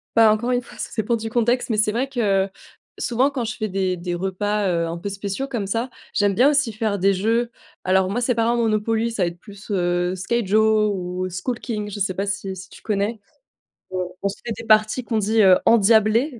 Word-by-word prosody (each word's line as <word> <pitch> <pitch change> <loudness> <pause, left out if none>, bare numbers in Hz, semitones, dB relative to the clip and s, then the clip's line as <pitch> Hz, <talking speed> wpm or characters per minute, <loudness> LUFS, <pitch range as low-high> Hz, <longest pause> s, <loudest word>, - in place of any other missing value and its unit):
Bah, 225 -1 +7
encore 225 +4 0
une 245 0 +1
fois, 240 - -15
ça - - -5
dépend 230 +1 0
du 225 0 -5
contexte, 240 +2 +1
mais 225 - +1
c'est 215 0 +2
vrai 245 +5 -1
que 200 -7 +1 0.5
souvent 250 +3 +1
quand 270 -4 -3
je 225 -1 -3
fais 215 - -2
des 190 -2 -1
des 175 0 -3
repas, 195 +2 -1
heu, 170 -1 0
un 165 +1 -4
peu 185 +4 -5
spéciaux 200 +7 -4
comme 230 -7 -3
ça, 230 +5 -1 0.2
j'aime 205 -1 +2
bien 250 +8 +5
aussi 285 -5 +2
faire 215 -1 -1
des 195 +2 +3
jeux. 230 +5 0 0.3
Alors 190 0 +2
moi, 225 +5 -1
c'est 245 +1 +2
pas 230 -1 +1
un 235 +1 +2
Monopoly, 225 0 0
ça 215 -5 -1
va - - +2
être 170 0 -6
plus, 205 +2 -14
heu, 175 -1 0
Skyjo 215 +1 +2
ou 180 0 -4
Skull 225 +7 -4
King, 210 -3 -4
je 205 - -6
sais 190 -1 0
pas 195 +2 -2
si 200 -1 -3
si 190 +1 -10
tu - - -15
connais? 210 +1 -1 0.7
On 185 -1 -2
on - - +2
se 195 - -7
fait 235 - -3
des - - -7
parties 215 +2 +3
qu'on 225 -2 -1
dit, 215 +2 +2
heu, 190 -1 +7
endiablées. 230 +4 +4
215 Hz, 230 wpm, -22 LUFS, 195-230 Hz, 0.7 s, Bah